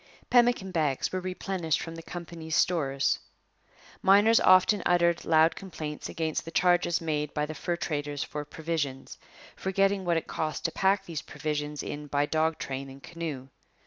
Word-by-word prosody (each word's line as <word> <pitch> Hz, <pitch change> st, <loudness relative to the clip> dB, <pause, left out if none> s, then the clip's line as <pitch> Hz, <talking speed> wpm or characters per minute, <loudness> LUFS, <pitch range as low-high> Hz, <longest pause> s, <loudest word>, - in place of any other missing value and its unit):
Pemmican 240 Hz, -6 st, +4 dB
bags 150 Hz, -6 st, 0 dB
were 185 Hz, -, -1 dB
replenished 185 Hz, -3 st, -2 dB
from 165 Hz, -, -6 dB
the 165 Hz, -, -8 dB
company's 165 Hz, -2 st, -6 dB
stores. 140 Hz, -6 st, +1 dB, 0.8 s
Miners 205 Hz, +4 st, +6 dB
often 185 Hz, +2 st, +5 dB
uttered 170 Hz, -1 st, +2 dB
loud 160 Hz, 0 st, +4 dB
complaints 155 Hz, -6 st, -6 dB
against 160 Hz, -2 st, -2 dB
the -, -, -8 dB
charges 175 Hz, 0 st, +2 dB
made 150 Hz, -2 st, -2 dB
by 150 Hz, 0 st, +1 dB
the 155 Hz, -, -6 dB
fur 175 Hz, +3 st, -2 dB
traders 145 Hz, -3 st, -3 dB
for 150 Hz, -, -5 dB
provisions, 150 Hz, -3 st, -4 dB, 0.4 s
forgetting 195 Hz, +1 st, +1 dB
what 170 Hz, -2 st, +1 dB
it 165 Hz, -, -2 dB
cost 155 Hz, +1 st, -3 dB
to 165 Hz, -, +1 dB
pack 195 Hz, +2 st, +2 dB
these 165 Hz, -3 st, -4 dB
provisions 150 Hz, -1 st, -4 dB
in 150 Hz, 0 st, -6 dB
by 145 Hz, +1 st, +1 dB
dog 160 Hz, +1 st, +1 dB
train 135 Hz, 0 st, -5 dB
and 135 Hz, +1 st, -13 dB
canoe. 155 Hz, -6 st, -6 dB
165 Hz, 160 wpm, -28 LUFS, 150-180 Hz, 0.8 s, Miners